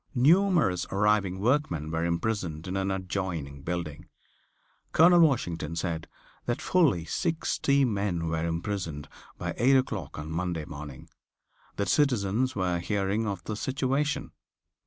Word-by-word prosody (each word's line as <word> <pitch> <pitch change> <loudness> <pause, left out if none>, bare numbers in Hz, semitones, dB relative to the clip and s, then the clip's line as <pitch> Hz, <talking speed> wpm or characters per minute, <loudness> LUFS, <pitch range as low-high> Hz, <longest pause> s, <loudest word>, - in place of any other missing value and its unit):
Numerous 155 - +3
arriving 100 -2 +1
workmen 100 - 0
were 80 +1 -1
imprisoned 85 -2 -2
in 95 - -3
an 95 0 0
adjoining 90 -7 -3
building. 85 0 -4 0.9
Colonel 175 +2 +7
Washington 85 - +2
said 85 -2 -3 0.4
that 120 - 0
fully 140 - +2
sixty 140 - +1
men 100 -7 -1
were 80 0 -1
imprisoned 85 -3 -3 0.3
by - - -3
eight 130 +4 +4
o'clock 105 - -1
on 75 +1 -6
Monday 85 -2 -2
morning. 75 -4 -9 0.7
The 100 - -1
citizens 125 -2 +1
were 90 -3 0
hearing 100 +4 -1
of 95 -4 -4
the 110 - -4
situation. 135 +4 -1
95 Hz, 125 wpm, -28 LUFS, 85-125 Hz, 0.9 s, Colonel